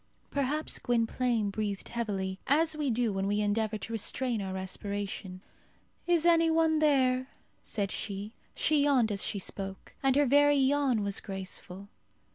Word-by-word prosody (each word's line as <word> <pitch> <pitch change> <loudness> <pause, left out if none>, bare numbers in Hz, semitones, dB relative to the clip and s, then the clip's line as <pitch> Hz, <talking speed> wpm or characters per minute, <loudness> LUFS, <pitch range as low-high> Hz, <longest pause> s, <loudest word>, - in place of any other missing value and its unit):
Perhaps 285 +3 -1
Gwynplaine 230 -2 0
breathed 205 -1 -3
heavily, 195 -5 -3
as 315 +3 +3
we 300 -2 -1
do 235 -2 +1
when 195 0 -1
we 205 +1 +1
endeavour 215 +1 0
to 230 - -7
restrain 235 +1 -1
our 190 -1 -4
respiration. 190 0 -5 0.7
"Is 345 -2 +3
any 330 -1 +5
one 320 -1 +3
there?" 260 -4 +3 0.3
said 200 -3 -3
she. 205 +1 -4 0.2
She 305 -2 +2
yawned 255 -6 +3
as 200 - -1
she 205 - -2
spoke, 195 0 -5
and 270 -1 +3
her 290 0 +4
very 290 +2 +5
yawn 270 -4 +2
was 200 -1 -2
graceful. 190 0 -7
230 Hz, 150 wpm, -30 LUFS, 200-285 Hz, 0.7 s, any